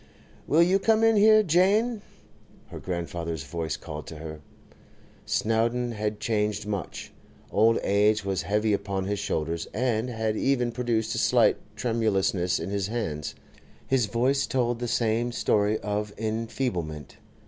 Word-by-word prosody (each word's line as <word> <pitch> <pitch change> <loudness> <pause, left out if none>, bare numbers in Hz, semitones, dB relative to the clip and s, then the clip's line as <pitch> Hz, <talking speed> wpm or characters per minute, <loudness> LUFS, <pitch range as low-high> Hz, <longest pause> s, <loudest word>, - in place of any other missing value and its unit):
'Will 160 +3 +5
you 185 +3 +3
come 220 +2 +3
in 225 0 +5
here, 215 +1 +6
Jane?' 205 +6 +2 0.7
her - - -8
grandfather's 85 -3 -4
voice 80 +3 -4
called 75 0 -8
to 80 - -8
her. 80 0 -8 0.9
Snowdon 115 +2 +1
had 105 -1 -3
changed 105 -2 -1
much. 100 -4 -5 0.4
Old 115 +1 +4
age 105 +1 +2
was 95 -2 -1
heavy 105 +4 +1
upon 100 -1 -2
his 100 +1 -2
shoulders, 80 +2 -2
and 120 0 0
had 110 -2 -1
even 125 -1 +1
produced 120 -2 -1
a - - -1
slight - - +4 0.2
tremulousness 100 -6 +1
in 95 - -5
his 100 -1 -1
hands; 80 -11 -3 0.5
his 130 -5 +1
voice 130 +5 +1
told 120 -2 0
the 120 - -2
same 115 +1 0
story 105 -2 +1
of 105 0 -2
enfeeblement. 110 - -3
110 Hz, 140 wpm, -26 LUFS, 95-120 Hz, 0.9 s, here